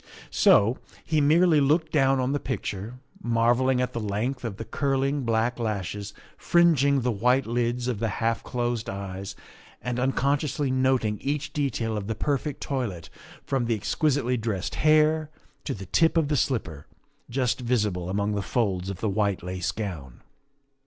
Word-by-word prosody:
So 110 +6 +4 0.3
he 155 -1 +1
merely 160 +1 +4
looked 155 +3 +2
down 135 -2 +3
on 130 +1 0
the 145 - 0
picture, 110 -4 -4 0.3
marvelling 120 +2 +2
at 125 - -2
the 115 - -2
length 115 +5 -2
of 110 -5 -4
the 115 - -6
curling 140 0 0
black 115 +2 0
lashes 105 -2 -3 0.3
fringing 145 -5 +4
the 125 0 +1
white 125 +5 +2
lids 120 +1 -1
of 120 -5 -2
the 115 - 0
half 115 -2 0
closed 120 -2 -2
eyes 95 0 -6 0.4
and 125 +2 -3
un 130 +2 +2
consciously 140 0 0
noting 130 -5 +1
each 140 +1 -2
detail 120 -6 -1
of 100 -1 -4
the 110 - -2
perfect 145 +3 -2
toilet, 115 - -3 0.3
from 135 -3 -1
the 115 -1 +1
exquisitely 130 +3 0
dressed 105 -5 -3
hair 155 0 +3 0.4
to - - -2
the 95 -1 -8
tip 165 - +2
of 155 -3 +2
the 150 - +1
slipper 85 - -2 0.4
just 125 0 0
visible 105 -8 0
among 100 +2 0
the 100 - -1
folds 95 -5 -1
of 95 -2 -6
the 110 - 0
white 100 -2 0
lace 90 0 -2
gown. 85 - -6
120 Hz, 165 wpm, -26 LUFS, 105-135 Hz, 0.4 s, So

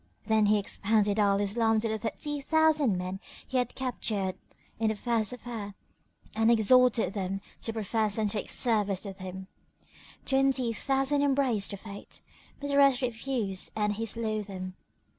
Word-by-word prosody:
Then 220 -2 +3
he 210 +1 +4
expounded 205 +1 +1
Al 200 -1 +3
Islam 225 +2 +1
to 230 - -1
the 220 0 -2
thirty 290 +7 -3
thousand 310 - +3
men 185 +1 -4 0.3
he 265 - -2
had 245 -1 -1
captured 215 -7 -2 0.5
in 225 - +1
the 220 - +1
first 225 0 0
affair 230 -5 -7 0.6
and 225 +1 +3
exhorted 235 0 +4
them 195 -1 -3 0.2
to 225 - -3
profess 220 -1 0
and 215 -1 +1
take 205 +1 -2
service 210 -5 +2
with 195 -1 -8
him. 185 0 -7 0.8
Twenty 265 -3 +2
thousand 270 +4 +1
embraced 265 -7 +1
the 200 - -5
Faith, 200 0 -8 0.4
but 285 0 -4
the 280 - +2
rest 275 -2 +5
refused 230 -5 -1
and 210 -1 +1
he 225 +2 -3
slew 220 -1 -2
them. 185 -2 -7
220 Hz, 160 wpm, -29 LUFS, 200-250 Hz, 0.8 s, rest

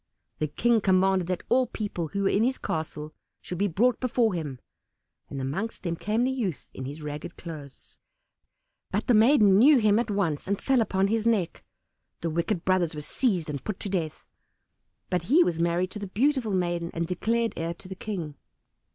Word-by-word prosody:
The 155 - 0
King 230 +8 +2
commanded 190 -1 +3
that 185 -1 -2
all 255 0 +3
people 205 -7 -4
who 200 +5 -2
were 195 - +3
in 210 - +2
his 260 +2 +1
castle 155 -1 -4 0.3
should 180 - -6
be 205 - +2
brought 230 +8 +2
before 240 -4 +1
him; 150 -7 -4 0.7
and 140 - -5
amongst 155 +13 -3
them 170 -2 -1
came 215 +7 0
the 260 - +1
youth 215 - -3
in 130 - -6
his 145 +3 -7
ragged 150 0 -6
clothes; 150 -5 -10 0.9
but - - -1
the 250 - +3
maiden 215 -4 +6
knew 280 +5 +7
him 215 -2 +4
at 235 -1 -1
once 185 -8 -1
and 200 0 0
fell 265 -3 +2
upon 190 -3 +1
his 220 +2 0
neck. 205 -7 0 0.6
The 165 - -1
wicked 170 +3 -1
brothers 180 -4 +2
were 150 - -5
seized 185 - 0
and 145 -2 -5
put 210 -3 -4
to 205 - -3
death, 170 -5 -3 0.9
but 180 -2 0
he 330 +7 +6
was 165 - -1
married 170 +2 +1
to 210 - -6
the 200 - -5
beautiful 235 0 +1
maiden 175 -2 -1
and 170 0 0
declared 225 +6 0
heir 165 +1 -3
to 185 - -13
the 190 - -6
King. 185 -6 -5
190 Hz, 195 wpm, -27 LUFS, 165-220 Hz, 0.9 s, knew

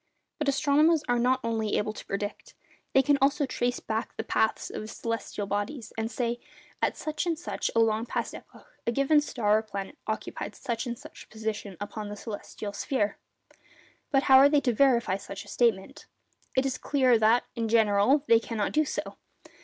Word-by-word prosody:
But 300 -2 +1
astronomers 300 +3 +3
are 245 -1 +2
not 255 +2 +2
only 225 -2 0
able 215 +1 -1
to - - -10
predict—they 205 +6 -3
can 285 +1 +3
also 285 +2 +3
trace 245 -1 -1
back 220 +1 -4
the - - -2
paths 220 0 0
of - - -5
the 215 - -7
celestial 225 -2 -4
bodies, 205 +5 -3
and 225 0 -2
say: 235 +1 -2 0.4
'At - - +1
such 310 +3 -3
and 330 -2 0
such 345 - -3
a - - +4
long 225 +1 +2
past - - -2
epoch, - - -13 0.2
a - - +3
given 275 +4 +4
star 215 -7 +1
or - - -3
planet 200 +4 -7
occupied - - -4
such 235 +1 -3
and 240 0 -4
such - - -12
a - - -35
position 215 -3 -5
upon 205 0 -5
the 205 - -6
celestial 205 -1 -6
sphere.' 210 0 -1 0.9
But 270 -1 +3
how 265 -1 +8
are 280 +1 +7
they 290 -1 +3
to 245 -3 +1
verify 235 -6 +3
such 195 +1 -8
a - - -18
statement? 205 -3 0 0.5
It 260 - +3
is 265 -1 -2
clear 260 -5 +3
that, 225 +3 +4
in 230 -2 -1
general, 225 +5 +4
they 230 - +6
cannot 225 -3 -2
do 310 0 +2
so. - - -4
230 Hz, 190 wpm, -28 LUFS, 215-270 Hz, 0.9 s, how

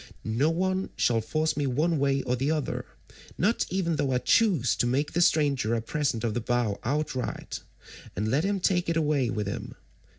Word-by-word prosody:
No 115 +8 +2
one 185 +3 0
shall 115 -2 +2
force 155 +8 0
me 145 -2 0
one 155 +5 +1
way 135 -1 +1
or 125 - 0
the 135 +4 -1
other, 155 -3 -2 0.5
not 210 +6 +1
even 170 -4 0
though 140 -2 0
I - - +3
choose 160 - +3
to 120 - +1
make 140 +4 0
the 175 - +1
stranger 140 -9 +2
a 115 - -1
present 130 -4 -1
of 115 -2 0
the 120 - -2
bow 120 -3 0
outright, 135 0 -2 0.6
and 105 +4 -1
let 145 +5 +2
him 200 0 0
take 180 -2 +1
it 165 - +1
away 150 -6 +1
with 105 -2 -2
him. 100 - -5
140 Hz, 195 wpm, -27 LUFS, 120-165 Hz, 0.6 s, I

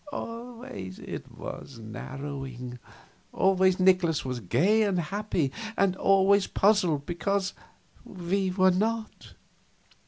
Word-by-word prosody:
Always 230 - -7
it - - -7
was 135 - -8
narrowing. 125 +2 -7 0.5
Always 190 -1 +3
Nikolaus 180 -5 +3
was 125 -1 -3
gay 175 - +3
and 200 -4 +2
happy, 175 -4 -1 0.3
and 195 -2 +3
always 195 +1 +4
puzzled 180 -8 +2
because 190 +3 -1 0.5
we 190 +1 -1
were 185 0 +4
not. 220 +4 -2
185 Hz, 100 wpm, -28 LUFS, 140-200 Hz, 0.5 s, always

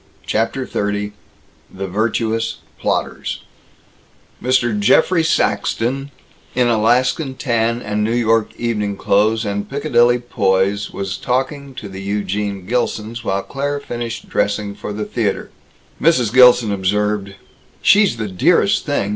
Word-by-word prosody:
CHAPTER 115 +4 -1
XXX 105 -1 -2 0.6
THE 95 +1 -5
VIRTUOUS 110 +3 -1 0.2
PLOTTERS - - -2 1.0
Mr. 120 -4 +1
Geoffrey 160 - +4
Saxton, 135 -4 0 0.5
in 125 -1 +3
Alaskan 125 +5 +2
tan 115 -2 0
and 105 0 -1
New 115 +2 0
York 115 -2 +2
evening 105 -4 -2
clothes 110 +3 +2
and 100 0 -3
Piccadilly 125 -4 +3
poise, 100 -4 0
was 95 -1 -4
talking 135 +3 -2
to 105 - -7
the 95 0 -8
Eugene 100 -1 -2
Gilsons 115 0 -2
while 95 -2 -1
Claire 145 +1 -3
finished 120 -3 -5
dressing 100 0 -1
for 105 - -7
the 105 +1 -4
theater. 105 -1 -2 0.5
Mrs. 125 -9 +3
Gilson 125 -3 +6
observed, 100 +1 -1 0.5
"She's 200 - +5
the 110 -2 -3
dearest 95 -2 +2
thing. 100 - 0
110 Hz, 120 wpm, -19 LUFS, 100-125 Hz, 1.0 s, Gilson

